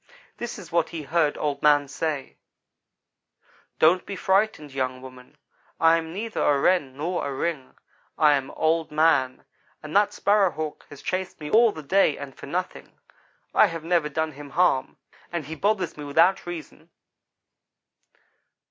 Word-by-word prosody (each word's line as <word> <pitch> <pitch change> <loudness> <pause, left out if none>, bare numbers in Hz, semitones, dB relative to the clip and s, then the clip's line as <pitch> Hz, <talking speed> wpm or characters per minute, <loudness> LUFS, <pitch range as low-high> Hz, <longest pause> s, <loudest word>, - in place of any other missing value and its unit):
This 240 0 -5
is 185 -6 -11
what 170 -1 +1
he 165 -3 -6
heard 150 +1 +1
Old 145 -2 -2
man 145 -1 +4
say: 145 0 -4 1.4
"'Don't 170 +4 +4
be 200 - -6
frightened, 190 -7 0
young 130 -1 -2
woman, 130 -1 -13 0.4
I 165 0 +5
am 160 -1 -5
neither 215 +5 -4
a 145 -1 +3
Wren 140 -5 +1
nor 175 +5 -2
a 140 - -3
ring. 135 -1 -4 0.4
I 150 -1 +5
am 135 -2 -1
Old 160 0 0
man 150 -4 +2 0.4
and 155 +2 -8
that 205 0 +4
Sparrow 200 -2 +3
hawk 155 -2 -6
has 145 - -12
chased 185 0 -3
me 150 -1 -7
all 230 0 +6
the 155 -5 -9
day 155 0 +3
and 140 -2 -8
for - - -11
nothing. 180 +5 -5 0.6
I - - +6
have 165 -1 -6
never 165 -2 +1
done 160 +2 -2
him 145 0 -11
harm, 170 -4 +1 0.3
and 170 -4 -3
he 155 - -6
bothers 190 +1 -1
me 150 - -8
without 165 +7 +2
reason.' 165 -1 -8
160 Hz, 160 wpm, -25 LUFS, 145-180 Hz, 1.4 s, all